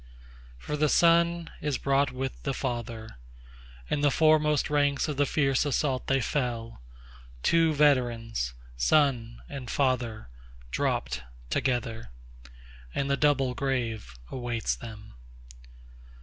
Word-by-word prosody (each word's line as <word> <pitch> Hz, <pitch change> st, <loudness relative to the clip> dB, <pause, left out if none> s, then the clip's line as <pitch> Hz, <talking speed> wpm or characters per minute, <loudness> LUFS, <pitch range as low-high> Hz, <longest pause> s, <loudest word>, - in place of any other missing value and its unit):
5For 150 Hz, 0 st, -3 dB
the 150 Hz, 0 st, +3 dB
son 170 Hz, 0 st, +3 dB
is 145 Hz, -3 st, -1 dB
brought 140 Hz, 0 st, +2 dB
with 130 Hz, +1 st, -4 dB
the 135 Hz, -2 st, -2 dB
father; 115 Hz, -, -4 dB, 0.7 s
In 145 Hz, -, -1 dB
the 145 Hz, -, +4 dB
foremost 150 Hz, 0 st, +3 dB
ranks 145 Hz, -1 st, +1 dB
of 150 Hz, -, -2 dB
the 145 Hz, 0 st, +2 dB
fierce 135 Hz, -3 st, +2 dB
assault 140 Hz, -2 st, 0 dB
they 135 Hz, 0 st, +3 dB
fell; 115 Hz, -, -2 dB, 0.6 s
Two 165 Hz, -1 st, +4 dB
veterans, 120 Hz, -, +1 dB, 0.2 s
son 120 Hz, -, +2 dB
and 135 Hz, -4 st, -7 dB
father, 125 Hz, -, 0 dB, 0.4 s
dropt -, -, -1 dB, 0.3 s
together, 115 Hz, -, -1 dB, 0.9 s
And 140 Hz, 0 st, 0 dB
the -, -, +4 dB
double 135 Hz, -3 st, +2 dB
grave 120 Hz, -, -2 dB, 0.2 s
awaits 120 Hz, -3 st, -2 dB
them. 110 Hz, -, -10 dB
135 Hz, 115 wpm, -28 LUFS, 115-145 Hz, 0.9 s, the